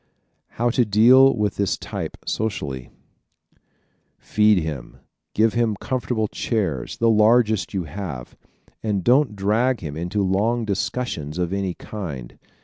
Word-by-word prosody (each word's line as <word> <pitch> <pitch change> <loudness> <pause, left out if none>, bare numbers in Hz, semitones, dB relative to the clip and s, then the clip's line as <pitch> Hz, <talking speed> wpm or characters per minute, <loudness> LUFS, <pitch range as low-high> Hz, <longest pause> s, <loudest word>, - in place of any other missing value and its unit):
How 120 +1 +2
to 125 - +3
Deal 120 +6 +6
with 105 -2 -1
this 100 -1 0
Type - - -6
Socially 70 - -3 0.7
¶ - - -36 0.6
Feed 105 -1 +3
him, 75 -6 -6 0.4
give 110 +1 +3
him 115 -3 +1
comfortable 120 -1 -2
chairs 95 - -2
the 115 - +2
largest 110 -2 +3
you 95 - -1
have 80 -6 -7 0.5
and 105 -4 -1
don't 125 - +3
drag 110 +6 +1
him 75 -4 -6
into 90 +5 -1
long 110 +5 +1
discussions 100 -6 -3
of 90 0 -1
any 95 -2 -2
kind. 75 - -7
105 Hz, 135 wpm, -22 LUFS, 90-115 Hz, 0.7 s, Deal